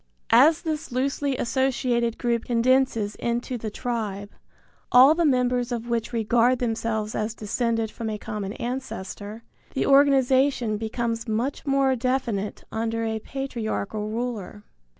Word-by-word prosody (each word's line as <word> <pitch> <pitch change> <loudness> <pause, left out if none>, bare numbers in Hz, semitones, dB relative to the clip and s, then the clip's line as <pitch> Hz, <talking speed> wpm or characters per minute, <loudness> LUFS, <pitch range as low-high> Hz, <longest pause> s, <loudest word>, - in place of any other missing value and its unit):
As 305 +8 +6
this 310 -4 -3
loosely 275 +1 -1
associated 240 -2 0
group 235 -2 -1
condenses 240 -3 +2
into 240 +2 -2
the 225 -2 -4
tribe, 210 -4 -4 0.6
all 260 +4 +8
the 335 +1 +1
members 250 -3 +1
of 240 0 -4
which 235 -1 -1
regard 235 +2 +2
themselves 225 -2 -2
as 215 +1 -2
descended 225 +1 -1
from 225 -1 -5
a 215 - -3
common 205 -1 -5
ancestor, 225 -4 -6 0.3
the - - +1
organization 270 -4 +4
becomes 230 +1 -3
much 240 +7 -2
more 275 -1 +3
definite 240 -5 -2
under 225 0 -2
a 220 0 -2
patriarchal 220 -5 -4
ruler. 220 -3 -4
235 Hz, 130 wpm, -25 LUFS, 220-260 Hz, 0.6 s, all